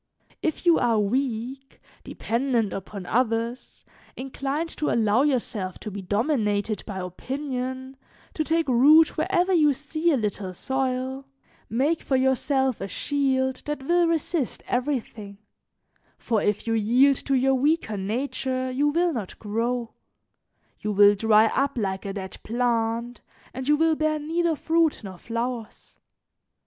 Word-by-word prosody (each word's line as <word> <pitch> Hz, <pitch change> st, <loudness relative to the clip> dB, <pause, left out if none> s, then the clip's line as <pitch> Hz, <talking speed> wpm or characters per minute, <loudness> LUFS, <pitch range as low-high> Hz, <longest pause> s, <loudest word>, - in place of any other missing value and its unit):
"If 320 Hz, +2 st, -2 dB
you 340 Hz, -2 st, +5 dB
are 235 Hz, -2 st, +2 dB
weak, 255 Hz, +4 st, -2 dB, 0.2 s
dependent 235 Hz, -3 st, -1 dB
upon 195 Hz, 0 st, -7 dB
others, 230 Hz, +2 st, -2 dB, 0.3 s
inclined 275 Hz, +4 st, -3 dB
to 305 Hz, -, 0 dB
allow 220 Hz, +1 st, +3 dB
yourself 225 Hz, -9 st, -1 dB
to 215 Hz, -, -6 dB
be 200 Hz, 0 st, -6 dB
dominated 210 Hz, -, 0 dB
by 200 Hz, -3 st, -5 dB
opinion, 260 Hz, +7 st, -5 dB, 0.4 s
to 310 Hz, -, -1 dB
take 325 Hz, +1 st, 0 dB
root 290 Hz, +6 st, +6 dB
wherever 365 Hz, +1 st, +1 dB
you 300 Hz, -4 st, +4 dB
see 310 Hz, +5 st, -1 dB
a 295 Hz, -, +3 dB
little 205 Hz, -4 st, -3 dB
soil, 265 Hz, +2 st, -2 dB, 0.4 s
make 280 Hz, +9 st, +1 dB
for 270 Hz, -, -1 dB
yourself 265 Hz, 0 st, +1 dB
a 195 Hz, -, -3 dB
shield 265 Hz, +2 st, 0 dB
that 295 Hz, -2 st, -3 dB
will 345 Hz, +2 st, +3 dB
resist 325 Hz, -4 st, -1 dB
everything, 240 Hz, -6 st, -3 dB, 0.8 s
for 220 Hz, -3 st, 0 dB
if 205 Hz, -1 st, 0 dB
you 225 Hz, -, 0 dB
yield 245 Hz, +6 st, +4 dB
to 275 Hz, -, -1 dB
your 265 Hz, +1 st, +3 dB
weaker 275 Hz, -4 st, +1 dB
nature 255 Hz, +5 st, -2 dB
you 280 Hz, +3 st, +1 dB
will 335 Hz, +3 st, +1 dB
not 215 Hz, -8 st, -5 dB
grow, 230 Hz, +2 st, -2 dB, 0.9 s
you 210 Hz, -, -2 dB
will 205 Hz, 0 st, +7 dB
dry 215 Hz, +1 st, +4 dB
up 275 Hz, +4 st, 0 dB
like 195 Hz, -3 st, -2 dB
a 195 Hz, -, -3 dB
dead 190 Hz, -2 st, -7 dB
plant, 235 Hz, 0 st, -1 dB, 0.3 s
and 260 Hz, +2 st, -4 dB
you 295 Hz, -, +5 dB
will 325 Hz, 0 st, +3 dB
bear 310 Hz, 0 st, 0 dB
neither 325 Hz, +2 st, 0 dB
fruit 325 Hz, -2 st, +1 dB
nor 190 Hz, -3 st, -9 dB
flowers. 235 Hz, -1 st, -5 dB
255 Hz, 140 wpm, -25 LUFS, 220-285 Hz, 0.9 s, will